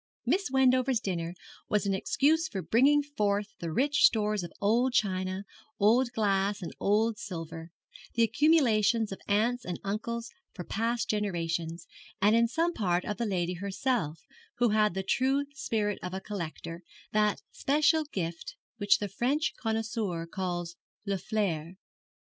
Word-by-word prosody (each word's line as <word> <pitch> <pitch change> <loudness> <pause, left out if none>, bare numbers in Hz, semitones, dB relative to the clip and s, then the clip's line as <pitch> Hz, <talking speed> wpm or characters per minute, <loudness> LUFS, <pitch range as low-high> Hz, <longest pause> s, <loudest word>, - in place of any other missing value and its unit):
Miss 390 -3 +1
Wendover's 260 -1 +3
dinner 175 -3 -3 0.3
was 210 -1 +1
an 200 - +1
excuse 310 +11 +2
for 195 -10 -4
the - - -15
bringing 285 +5 +4
forth 210 -7 -1
of 165 -2 -4
rich 290 +3 +2
stores 210 -2 +2
of 175 - -7
old 235 +5 +2
china, 185 -3 0 0.4
old 235 +4 +4
glass, 200 -2 +1
and 170 - -6
older 220 +3 +2
silver 165 -3 -6 0.5
the 230 - +4
accumulations 230 -6 +3
of 195 - -6
aunts 225 +4 +1
and 180 -1 -4
uncles 230 +4 -3 0.2
for 180 - -5
past 230 +5 -1
generations, 170 -5 -2 0.3
and 210 +3 +4
in 235 0 +4
some 330 +8 0
part 180 - 0
of 210 -2 -3
the 235 - -1
lady 180 -3 -1
herself, 195 - -2 0.3
who 240 -1 +2
had 210 -3 +2
the 190 - -1
true 265 +7 +1
spirit 210 -7 -1
of 180 +1 -5
a - - -2
collector, 170 -4 -6 0.3
that 210 -1 +1
special 305 +3 +2
gift 170 - -5 0.2
which 205 -2 +4
the 205 - -3
French 260 - 0
connoisseur 220 -6 -2
calls 175 -1 -4 0.3
le 200 -2 -1
flair. 180 -5 -2
210 Hz, 150 wpm, -29 LUFS, 185-240 Hz, 0.5 s, bringing